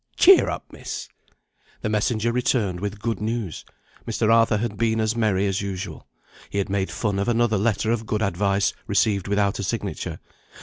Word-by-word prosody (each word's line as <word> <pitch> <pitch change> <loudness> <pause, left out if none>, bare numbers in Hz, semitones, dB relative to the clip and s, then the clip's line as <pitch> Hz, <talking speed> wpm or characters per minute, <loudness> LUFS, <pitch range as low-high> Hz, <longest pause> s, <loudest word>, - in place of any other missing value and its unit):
Cheer 385 0 +7
up, - - -4
Miss." - - -6 0.7
The 110 - -1
messenger 110 +2 +1
returned 115 -6 0
with 100 +2 -4
good 115 0 -2
news. 110 -5 -3 0.4
Mr. 115 0 +2
Arthur 115 -2 +4
had 110 -1 -2
been 110 +1 +1
as 110 +1 +1
merry 105 -4 +1
as 100 0 0
usual. 95 -2 -5 0.4
He - - -4
had 100 - 0
made 95 -1 0
fun 100 -3 -1
of 100 - -1
another 120 -3 +2
letter 110 +1 +1
of 115 -2 -1
good 110 0 0
advice, 100 +1 +1
received 100 -2 +1
without 100 -1 +1
a - - -2
signature. - - -3
105 Hz, 175 wpm, -24 LUFS, 100-115 Hz, 0.7 s, Cheer